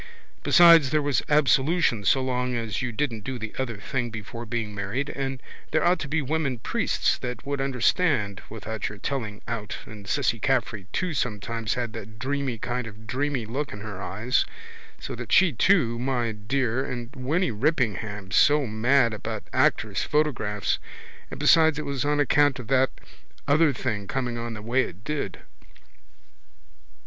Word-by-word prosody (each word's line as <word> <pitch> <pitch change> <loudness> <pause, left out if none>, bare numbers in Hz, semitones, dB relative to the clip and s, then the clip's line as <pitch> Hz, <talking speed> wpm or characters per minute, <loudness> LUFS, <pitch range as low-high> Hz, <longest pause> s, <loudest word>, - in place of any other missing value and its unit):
Besides 170 -5 +7
there 155 - +2
was 145 -4 +1
absolution 145 -3 +3
so 130 +7 +4
long 125 -1 -1
as 115 -1 -2
you 125 -1 -2
didn't 115 -3 -2
do 130 +3 -4
the 110 -2 -6
other 120 -5 -2
thing 120 +4 -2
before 115 +1 -7
being 110 -2 -3
married 105 +8 -3
and 135 -1 -3 0.3
there - - +1
ought 175 0 +4
to 150 - -4
be 155 +1 0
women 140 -2 -1
priests 115 - 0
that 125 +1 -5
would 140 -1 -2
understand 125 - +1
without 110 -1 -4
your 105 - -9
telling 110 -2 -4
out 110 -2 -4
and 105 -2 -11
Cissy 115 +2 +1
Caffrey 115 -6 0
too 185 -3 -1
sometimes 115 -3 -2
had 120 -3 -3
that 110 -1 -9
dreamy 135 0 -2
kind 125 +1 -3
of 110 +1 -12
dreamy 130 0 -1
look 135 +6 -3
in 105 - -8
her 100 -3 -7
eyes 110 +7 0 0.6
so - - -6
that - - -7
she 185 -5 +5
too, 120 - +3
my 125 -2 0
dear, 120 +4 -1
and 125 0 -6
Winny 155 +8 0
Rippingham 105 - -1
so 145 - +5
mad 120 +2 +3
about 105 - -5
actors' - - +2
photographs 125 -9 0 0.5
and - - -8
besides 160 -2 +5
it 155 - -4
was 140 -3 -2
on 145 0 +1
account 145 -1 +3
of 125 -2 -9
that 130 -1 +4 0.6
other 150 +2 +5
thing 110 -6 -3
coming 125 0 -2
on 115 -1 -4
the 105 - -8
way 120 +4 +2
it 95 -2 -6
did. 150 +3 -3
125 Hz, 165 wpm, -26 LUFS, 110-140 Hz, 0.6 s, Besides